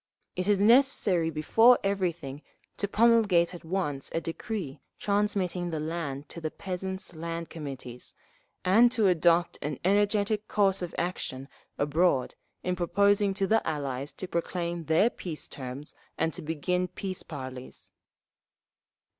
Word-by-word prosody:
It 185 +1 -2
is 205 -2 +3
necessary 210 -7 +4
before 225 +11 +5
everything 170 -8 -2 0.4
to 200 - -1
promulgate 210 -6 +4
at 175 - -9
once 160 -6 -2
a - - +2
decree 165 - -5 0.2
transmitting 200 -4 0
the 160 -2 -3
land 150 -3 -4
to 170 - -8
the 155 - -2
peasants' 190 +1 -5
Land 165 +1 -5
Committees, 135 -6 -7 0.5
and 225 +6 +6
to 220 -4 +2
adopt 175 -1 +3
an 150 -2 -3
energetic 205 +2 +2
course 195 -2 +2
of 175 - -5
action 135 -6 -3 0.3
abroad 145 -1 +2 0.3
in 180 0 0
proposing 200 +3 +2
to 195 0 +1
the 220 +3 +3
Allies 140 -3 -3
to 185 - -6
proclaim 170 -1 -3
their 165 +10 +3
peace 165 -4 -6
terms 135 +2 -7 0.2
and 160 0 0
to - - -6
begin 170 +4 -1
peace 185 0 -5
parleys; 130 -4 -8
3. - - -57
175 Hz, 140 wpm, -28 LUFS, 155-200 Hz, 0.5 s, and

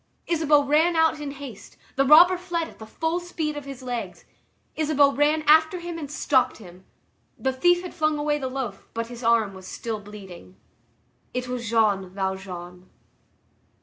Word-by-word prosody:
Isabeau 305 -3 +3
ran 310 +5 +3
out 320 -1 +3
in 295 -1 -5
haste; 275 -6 -10 0.2
the 275 - +3
robber 330 +6 +7
fled 350 -2 -3
at - - -16
the 220 - -10
full 325 +8 -2
speed 325 -4 -4
of 290 -1 -7
his 275 -2 -9
legs. 245 -2 -5 0.5
Isabeau 295 -2 +3
ran 300 +2 +2
after 315 +4 +4
him 345 -1 -6
and 290 -3 -6
stopped 260 -4 +1
him. 185 -3 -14 0.5
The 265 0 -1
thief 350 +7 +3
had 360 - -7
flung 310 -1 0
away 295 0 0
the 260 -2 -3
loaf, 255 -7 -5
but 230 0 -3
his 240 +1 -9
arm 225 -3 +2
was 190 -1 -11
still 225 -2 -5
bleeding. 195 -3 -12 0.8
It 250 0 -2
was 245 -3 -4
Jean 210 -5 +2
Valjean. 185 -2 -6
275 Hz, 170 wpm, -24 LUFS, 220-310 Hz, 0.8 s, robber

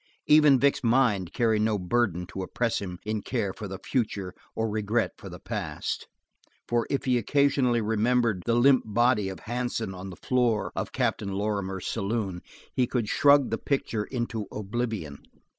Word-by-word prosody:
Even 150 -3 +6
Vic's 140 0 +2
mind 115 -7 +2
carried 110 -3 +2
no 110 -1 +2
burden 90 -2 0
to 95 +2 -6
oppress 115 +5 -1
him 90 -3 -5
in 110 0 -2
care 100 -1 -2
for 105 - -7
the 95 0 -6
future 100 -5 -2 0.2
or 115 - 0
regret 110 +2 0
for - - -9
the - - -8
past, - - -4 0.6
for 120 -1 0
if 140 - -1
he 125 -2 +3
occasionally 130 -1 +2
remembered 110 -1 +1
the 115 - +3
limp 130 +2 +5
body 110 -1 +2
of 95 - -8
Hansen 120 -3 -3
on 95 +1 -7
the 90 - -8
floor 120 -4 +1
of - - -3
Captain 100 -1 -1
Lorrimer's 95 -2 -2
saloon 100 -3 -2 0.3
he 125 -2 +2
could 115 -4 -1
shrug 140 0 +5
the 115 - -1
picture 115 -6 -1
into 120 -4 -3
oblivion. 105 - -4
110 Hz, 165 wpm, -27 LUFS, 100-125 Hz, 0.6 s, Even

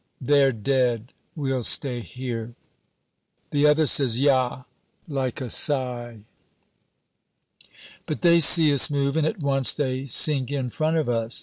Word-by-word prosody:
(They're 140 0 +2
dead. 125 0 -2 0.2
We'll 135 -4 -3
stay 125 +1 +1
here.) 120 -1 -8 1.0
The 145 +1 +2
other 150 +1 +2
says, 130 -5 +2
"Ja," 130 -2 0 0.4
like 135 -4 -4
a 125 - -6
sigh. 120 -5 -3 1.9
But 155 - -5
they 170 -1 +4
see 155 -1 +6
us 140 - +5
move, 140 -1 -2
and 160 -1 0
at 155 - -5
once 135 -2 +1
they 135 -2 -4
sink 135 0 +2
in 130 -4 -4
front 160 +4 -2
of 155 - -2
us. 115 -1 -1
135 Hz, 135 wpm, -23 LUFS, 125-145 Hz, 1.9 s, see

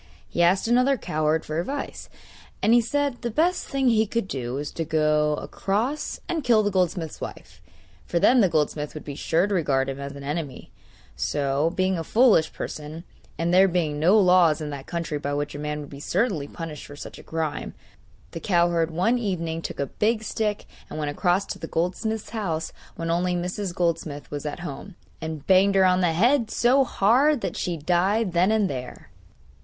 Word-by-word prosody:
He - - -1
asked 180 +5 +3
another 250 +3 +3
cowherd 155 -4 0
for 155 +1 -2
advice, 275 +11 -5 0.5
and 225 - +5
he 240 - +6
said 280 +2 -1
the 240 - -2
best 335 +10 +1
thing 270 -1 0
he 220 -2 +3
could 230 -1 -2
do 125 -6 -4
was 145 +1 -4
to 165 - -3
go 155 -1 +2
across 225 - -2
and 330 -4 -2
kill 230 -4 +4
the 205 - 0
goldsmith's 180 -4 -1
wife, - - -9 0.5
for 175 - -1
then 245 +8 +5
the 190 - +4
goldsmith 150 -1 -1
would 155 - -7
be 145 - -5
sure 160 +5 +1
to 205 - -2
regard 135 -7 +1
him 135 0 -5
as 140 0 -6
an 140 0 -9
enemy; 145 -2 -5 0.4
so, 140 +2 0
being 185 -1 +1
a - - -3
foolish 215 -5 +4
person, 155 +2 -7 0.3
and 170 +1 0
there 190 +1 +7
being 165 -5 -1
no 185 +8 +5
laws 180 -5 +5
in 150 -1 -5
that 140 -1 -7
country 165 -3 -3
by 145 0 -2
which 145 0 -3
a 145 - -6
man 150 0 -3
would 145 - -9
be 140 - -9
certainly 165 - 0
punished 160 -2 -7
for 145 - -10
such - - -9
a - - -12
crime, 160 -2 -4 0.6
the 165 - -6
cowherd 170 -2 +2
one 185 +10 +1
evening 170 -7 -2
took - - -6
a 140 - +1
big 215 - 0
stick 210 -1 -2 0.2
and - - -7
went 150 -1 -2
across 180 +5 +1
to - - -6
the 165 - -6
goldsmith's 195 +7 -2
house 165 -8 -3 0.2
when 165 0 -3
only 180 +1 +1
Mrs. 180 +2 -3
Goldsmith 160 -4 -2
was 145 0 -4
at 150 - -5
home, 175 +4 -7 0.3
and 160 -2 -5
banged 195 +1 +4
her 190 -1 +5
on 185 0 +3
the 175 -2 +2
head 235 - +3
so 255 +5 +3
hard 255 +5 +3
that - - -3
she 175 -2 -2
died 185 +6 +1
then 180 +4 +3
and 215 -2 +2
there. 125 - -7
175 Hz, 200 wpm, -25 LUFS, 150-210 Hz, 0.6 s, there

